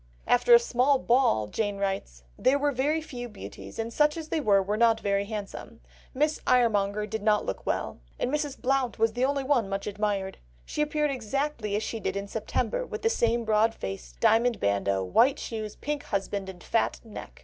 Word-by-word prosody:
After 245 - +3
a - - +8
small 275 - +2
ball 240 - +2
Jane 205 - -2
writes: 195 - -3
"There 270 +2 +3
were 290 0 +1
very 290 +5 0
few 245 -6 -7
beauties, 210 - -10
and 225 +1 -3
such 300 +3 +3
as 320 -1 -6
there 320 - 0
were 200 -7 +4
were 205 +2 -1
not 225 0 +4
very 200 -1 0
handsome. 210 -1 -7 0.3
Miss 300 +3 0
Iremonger 210 -4 +2
did 220 +1 -4
not 210 0 +2
look 95 - -5
well, - - -2 0.2
and 250 - -1
Mrs. 295 -2 -2
Blount 260 -1 0
was 225 0 +2
the 245 - -1
only 275 +1 +1
one 255 -7 +1
much 195 0 -3
admired. 205 -2 -2 0.3
She - - -3
appeared 300 0 +1
exactly 255 -3 -2
as 210 - -1
she 225 - -4
did - - -3
in 200 0 -4
September, 230 - -2
with - - -7
the 455 - +3
same 235 - +1
broad 220 +1 +2
face, 95 -12 -6
diamond 235 - +3
bandeau, 100 -1 +1
white 245 - +3
shoes, 215 -2 -5
pink 295 0 -4
husband, 195 -1 -3
and 180 -2 -10
fat 230 - 0
neck. 225 -2 -10
225 Hz, 195 wpm, -27 LUFS, 200-275 Hz, 0.3 s, a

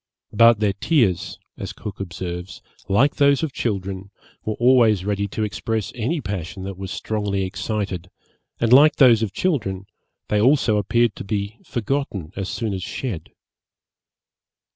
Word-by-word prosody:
'But 115 0 +6
their 105 -2 +1
tears,' 100 - +1 0.2
as - - -5
Cook 105 - -8
observes, 90 -1 -6 0.3
'like 125 +9 +3
those 140 0 +4
of 150 -4 -2
children, 100 -3 -3 0.3
were 110 - -2
always 120 -6 +4
ready 100 0 -1
to 110 +2 -3
express 110 0 -2
any 125 +8 -1
passion 95 - -5
that 95 0 -5
was 95 +1 -7
strongly 100 -1 -2
excited, 95 -2 -3 0.5
and 115 +1 +3
like 150 +4 +7
those 120 -5 +6
of 110 -4 -1
children, 100 - -1 0.4
they 105 -1 +1
also 125 -3 +4
appeared 115 +2 +2
to - - -6
be 100 +2 -3
forgotten 110 - -3
as 95 -1 -4
soon 110 -3 -2
as 95 - -4
shed.' 90 - -5
105 Hz, 145 wpm, -22 LUFS, 95-120 Hz, 0.5 s, like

